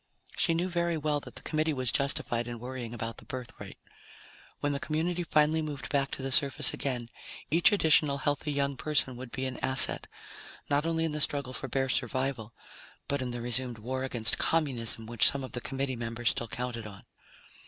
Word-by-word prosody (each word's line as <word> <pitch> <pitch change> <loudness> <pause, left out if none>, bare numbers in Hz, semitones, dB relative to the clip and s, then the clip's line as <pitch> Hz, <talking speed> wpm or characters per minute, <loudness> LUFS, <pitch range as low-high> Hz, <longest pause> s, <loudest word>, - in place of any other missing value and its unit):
She 170 -4 +1
knew 175 +2 -1
very 170 -2 -1
well 150 -1 -1
that - - -13
the - - -10
Committee 155 -1 -1
was 130 -3 -1
justified 120 -4 +1
in 120 0 -6
worrying 125 -1 -7
about 115 -1 -6
the - - -13
birth 130 -4 -7
rate. - - -10 0.8
When 145 0 -1
the 140 - -3
community 165 +4 -2
finally 155 -1 +2
moved 145 -4 -6
back 140 -1 0
to 130 - -6
the 135 - -3
surface 140 0 +6
again, 125 -4 -4 0.4
each 165 +2 +5
additional 155 -7 +3
healthy 145 +1 -2
young 140 -1 -1
person 135 -4 +1
would 125 0 -9
be 130 - -4
an 130 -1 -5
asset, 130 0 +7 0.6
not 145 +3 +1
only 165 0 0
in 160 - -2
the 150 0 -3
struggle 140 -3 -1
for - - -5
bare 135 -1 -1
survival, 130 -2 -2 0.6
but 140 -1 -1
in 125 - -3
the 120 -1 -5
resumed 120 0 -2
war 130 +4 -4
against 120 -4 0
Communism 120 -8 -1
which 115 0 +3
some 140 -1 -4
of 130 - -8
the 120 - -4
Committee 135 0 -3
members 115 0 -2
still 120 - -2
counted 115 0 -5
on. 100 -2 -12
135 Hz, 195 wpm, -29 LUFS, 120-150 Hz, 0.8 s, asset